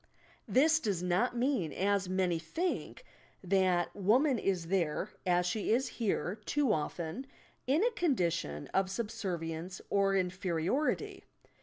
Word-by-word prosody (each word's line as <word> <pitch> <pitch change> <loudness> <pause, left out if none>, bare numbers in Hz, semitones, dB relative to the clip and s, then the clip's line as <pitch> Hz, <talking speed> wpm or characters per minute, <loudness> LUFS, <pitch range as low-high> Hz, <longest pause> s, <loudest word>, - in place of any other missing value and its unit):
This 315 +4 +4
does 200 - -1
not 185 +8 +1
mean, 240 - +1
as 200 -1 0
many 185 -3 +1
think, 350 - -3 0.4
that 185 -2 +2
woman 240 +7 +3
is 180 -5 -1
there 185 +1 0 0.2
(as 180 0 +3
she 205 +4 -1
is 250 +4 +2
here, 205 -3 -1
too 280 -1 +1
often) 165 - -3 0.4
in 295 +9 +3
a 485 - +3
condition 170 - 0
of 190 -1 +2
subservience 185 -5 -4
or 195 -1 +3
inferiority. 185 - -1
195 Hz, 125 wpm, -32 LUFS, 175-245 Hz, 0.4 s, This